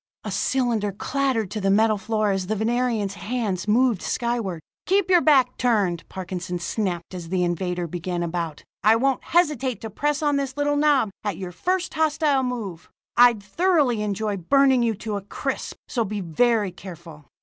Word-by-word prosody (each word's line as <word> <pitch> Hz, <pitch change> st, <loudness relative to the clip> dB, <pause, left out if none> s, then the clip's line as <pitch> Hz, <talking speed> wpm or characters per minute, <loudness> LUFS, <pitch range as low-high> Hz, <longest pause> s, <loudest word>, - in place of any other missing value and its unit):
A -, -, -5 dB
cylinder 235 Hz, -6 st, 0 dB
clattered 245 Hz, -1 st, -1 dB
to 215 Hz, -, -3 dB
the 195 Hz, -, +1 dB
metal 215 Hz, +1 st, +3 dB
floor 215 Hz, 0 st, 0 dB
as 190 Hz, -2 st, -2 dB
the 215 Hz, -, 0 dB
Venerian's 225 Hz, -2 st, 0 dB
hands 205 Hz, -3 st, -3 dB
moved 230 Hz, -2 st, +3 dB
skyward. 235 Hz, -8 st, -2 dB, 0.3 s
"Keep 380 Hz, 0 st, +2 dB
your 355 Hz, -2 st, +6 dB
back 265 Hz, -5 st, +4 dB
turned!" 200 Hz, -9 st, +1 dB
Parkinson 180 Hz, -1 st, -5 dB
snapped 175 Hz, -1 st, -3 dB
as 175 Hz, -3 st, -7 dB
the 180 Hz, 0 st, +1 dB
invader 175 Hz, 0 st, -1 dB
began 175 Hz, +1 st, -3 dB
about. 165 Hz, -2 st, -4 dB, 0.2 s
"I 215 Hz, +2 st, +6 dB
won't 265 Hz, +3 st, +1 dB
hesitate 295 Hz, -8 st, +1 dB
to 220 Hz, -, -6 dB
press 295 Hz, +7 st, -1 dB
on 290 Hz, -1 st, +2 dB
this 275 Hz, -1 st, -3 dB
little 290 Hz, 0 st, +1 dB
knob, 290 Hz, -7 st, +3 dB
at 205 Hz, -1 st, -2 dB
your 185 Hz, -2 st, -6 dB
first 360 Hz, -, -1 dB
hostile 305 Hz, -3 st, +2 dB
move! 220 Hz, -10 st, -5 dB, 0.3 s
I'd 240 Hz, -4 st, +5 dB
thoroughly 285 Hz, -, +2 dB
enjoy 210 Hz, 0 st, -2 dB
burning 265 Hz, +7 st, +3 dB
you 230 Hz, -2 st, +1 dB
to 215 Hz, 0 st, -4 dB
a -, -, -5 dB
crisp, 195 Hz, -, -4 dB
so 235 Hz, -, 0 dB
be 210 Hz, 0 st, -4 dB
very 205 Hz, +4 st, +1 dB
careful." 170 Hz, -4 st, -11 dB
220 Hz, 170 wpm, -24 LUFS, 185-260 Hz, 0.3 s, your